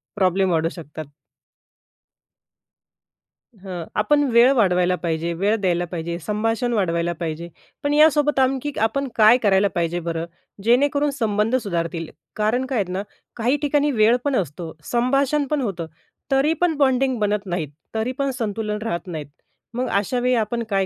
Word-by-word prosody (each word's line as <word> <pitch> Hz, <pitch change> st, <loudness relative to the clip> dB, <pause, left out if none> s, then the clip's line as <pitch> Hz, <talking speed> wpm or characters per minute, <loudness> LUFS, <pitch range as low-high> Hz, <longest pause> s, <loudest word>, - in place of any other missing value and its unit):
Problem 190 Hz, -1 st, +2 dB
वाढू 165 Hz, -1 st, +1 dB
शकतात. 155 Hz, -3 st, -9 dB, 2.5 s
हां. 185 Hz, -4 st, -7 dB
आपण 290 Hz, +8 st, +3 dB
वेळ 235 Hz, +3 st, +6 dB
वाढवायला 180 Hz, -6 st, +2 dB
पाहिजे. 165 Hz, 0 st, -1 dB
वेळ 200 Hz, +6 st, +1 dB
द्यायला 175 Hz, -2 st, +1 dB
पाहिजे. 170 Hz, -1 st, -4 dB
संभाषण 225 Hz, +6 st, -1 dB
वाढवायला 170 Hz, -4 st, 0 dB
पाहिजे. 170 Hz, 0 st, -4 dB, 0.3 s
पण 285 Hz, -, +1 dB
यासोबत 295 Hz, -1 st, +4 dB
आणखी 265 Hz, +2 st, +1 dB
आपण 275 Hz, +5 st, 0 dB
काय 220 Hz, +2 st, +7 dB
करायला 200 Hz, -1 st, +4 dB
पाहिजे 170 Hz, 0 st, 0 dB
बरं? 165 Hz, -1 st, -3 dB, 0.4 s
जेणेकरून 285 Hz, +5 st, +3 dB
संबंध 225 Hz, -2 st, 0 dB
सुधारतील. 170 Hz, -4 st, -3 dB, 0.3 s
कारण 220 Hz, +5 st, 0 dB
काय 260 Hz, -3 st, -1 dB
आहे 180 Hz, -, -9 dB
ना, 190 Hz, +2 st, -2 dB, 0.3 s
काही 245 Hz, +5 st, +1 dB
ठिकाणी 290 Hz, 0 st, +2 dB
वेळ 225 Hz, -1 st, +4 dB
पण 280 Hz, -2 st, +1 dB
असतो, 165 Hz, -, -3 dB, 0.2 s
संभाषण 275 Hz, +4 st, +2 dB
पण 300 Hz, -1 st, 0 dB
होतं. 180 Hz, -8 st, -3 dB, 0.4 s
तरी 275 Hz, +4 st, +3 dB
पण 345 Hz, -3 st, +2 dB
बॉन्डिंग 265 Hz, -2 st, +2 dB
बनत 210 Hz, -1 st, 0 dB
नाहीत, 175 Hz, -5 st, -3 dB, 0.3 s
तरी 220 Hz, +3 st, 0 dB
पण 275 Hz, -1 st, 0 dB
संतुलन 215 Hz, -2 st, -2 dB
राहत 175 Hz, -4 st, -3 dB
नाहीत, 155 Hz, -5 st, -5 dB, 0.5 s
मग 250 Hz, +1 st, -2 dB
अशावेळी 245 Hz, +5 st, +1 dB
आपण 230 Hz, +1 st, -1 dB
काय 195 Hz, -2 st, +1 dB
215 Hz, 145 wpm, -22 LUFS, 175-260 Hz, 2.5 s, काय